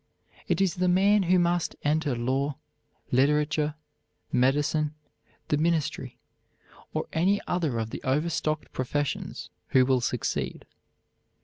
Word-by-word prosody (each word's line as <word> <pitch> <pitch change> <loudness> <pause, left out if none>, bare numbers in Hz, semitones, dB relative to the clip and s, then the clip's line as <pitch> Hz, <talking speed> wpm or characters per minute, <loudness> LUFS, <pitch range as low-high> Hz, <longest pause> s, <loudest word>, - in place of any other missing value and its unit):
It - - +1
is 190 -4 +2
the 180 0 0
man 200 +3 +4
who 185 0 +3
must 175 -1 +1
enter 150 -2 +1
law, 135 +4 -1 0.5
literature, 150 +3 +2 0.6
medicine, 145 +4 +2 0.5
the 150 - +2
ministry, 160 -1 -1 0.7
or - - -2
any 190 +5 +2
other 160 -9 -1
of 110 -1 -3
the - - -6
overstocked 155 +2 -1
professions, 140 +2 -3 0.2
who 130 -1 +4
will 130 -1 +2
succeed. - - -2
150 Hz, 115 wpm, -27 LUFS, 135-170 Hz, 0.7 s, man